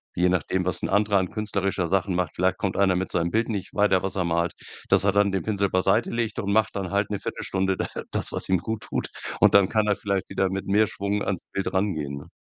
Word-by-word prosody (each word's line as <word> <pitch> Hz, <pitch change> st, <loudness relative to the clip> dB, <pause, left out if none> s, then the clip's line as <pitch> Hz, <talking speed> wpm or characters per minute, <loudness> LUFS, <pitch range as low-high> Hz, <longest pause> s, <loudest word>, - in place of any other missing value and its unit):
je 90 Hz, +1 st, +3 dB
nachdem, 90 Hz, +1 st, 0 dB
was 90 Hz, -3 st, +1 dB
'n -, -, -1 dB
anderer 100 Hz, -1 st, +3 dB
an 90 Hz, -1 st, -1 dB
künstlerischer 100 Hz, -4 st, -1 dB
Sachen 95 Hz, +1 st, 0 dB
macht, 90 Hz, -3 st, -1 dB
vielleicht 95 Hz, +1 st, +1 dB
kommt 95 Hz, -2 st, -2 dB
einer 95 Hz, -2 st, +3 dB
mit 95 Hz, +1 st, -2 dB
seinem 85 Hz, 0 st, 0 dB
Bild 115 Hz, +1 st, 0 dB
nicht 100 Hz, -4 st, -4 dB
weiter, 100 Hz, -3 st, +3 dB
was 95 Hz, -1 st, -2 dB
er 90 Hz, -2 st, 0 dB
malt, 85 Hz, 0 st, 0 dB, 0.4 s
dass -, -, +5 dB
er 100 Hz, -, +3 dB
dann 100 Hz, 0 st, +3 dB
den 95 Hz, -, -1 dB
Pinsel 100 Hz, -2 st, 0 dB
beiseitelegt 110 Hz, +4 st, +1 dB
und 100 Hz, 0 st, -1 dB
macht 110 Hz, -2 st, +2 dB
dann 95 Hz, -3 st, -3 dB
halt 100 Hz, 0 st, 0 dB
'ne 105 Hz, -, -2 dB
Viertelstunde 95 Hz, -1 st, -1 dB
d -, -, -1 dB, 0.3 s
das, -, -, -1 dB
was -, -, +1 dB
ihm 95 Hz, -, +3 dB
gut 110 Hz, -1 st, -4 dB
tut. -, -, -3 dB, 0.3 s
Und -, -, +5 dB
dann 100 Hz, -1 st, +6 dB
kann 110 Hz, -1 st, +1 dB
er 105 Hz, -, +3 dB
vielleicht 100 Hz, -2 st, -2 dB
wieder 95 Hz, -1 st, 0 dB
mit 95 Hz, 0 st, -4 dB
mehr 105 Hz, +2 st, +4 dB
Schwung 100 Hz, +1 st, -2 dB
ans 95 Hz, -4 st, -2 dB
Bild 95 Hz, 0 st, -2 dB
rangehen, 80 Hz, -8 st, -1 dB
ne? 70 Hz, -, -10 dB
95 Hz, 245 wpm, -25 LUFS, 95-100 Hz, 0.4 s, dann